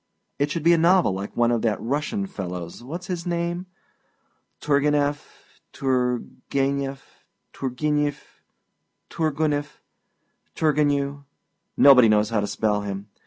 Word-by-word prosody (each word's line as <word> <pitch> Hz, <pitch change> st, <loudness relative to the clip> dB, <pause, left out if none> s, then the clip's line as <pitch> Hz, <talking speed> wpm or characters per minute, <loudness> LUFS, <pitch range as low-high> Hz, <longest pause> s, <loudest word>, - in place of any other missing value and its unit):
It 145 Hz, +1 st, +1 dB
should 160 Hz, +1 st, -3 dB
be 170 Hz, +1 st, +6 dB
a 170 Hz, -, +3 dB
novel 175 Hz, -, +4 dB
like 100 Hz, +2 st, -6 dB
one 120 Hz, 0 st, +3 dB
of 120 Hz, -2 st, +1 dB
that 110 Hz, -3 st, 0 dB
Russian 150 Hz, -, -2 dB
fellowâs 90 Hz, -, -6 dB
whatâs 165 Hz, +9 st, -7 dB
his 175 Hz, -2 st, -4 dB
name? 175 Hz, +1 st, -2 dB, 0.9 s
Tourguenieff, 145 Hz, 0 st, +1 dB, 0.4 s
Turguenef, 135 Hz, +2 st, -1 dB, 0.5 s
Turgenif, 145 Hz, +2 st, -1 dB, 0.9 s
Toorguniff, 150 Hz, -2 st, -1 dB, 0.8 s
Turgenjew 145 Hz, -2 st, +1 dB, 0.5 s
nobody 125 Hz, -5 st, +7 dB
knows 105 Hz, +1 st, +2 dB
how 110 Hz, -, +1 dB
to 105 Hz, -, -1 dB
spell 105 Hz, -1 st, 0 dB
him. 100 Hz, 0 st, -6 dB
140 Hz, 115 wpm, -24 LUFS, 120-155 Hz, 0.9 s, nobody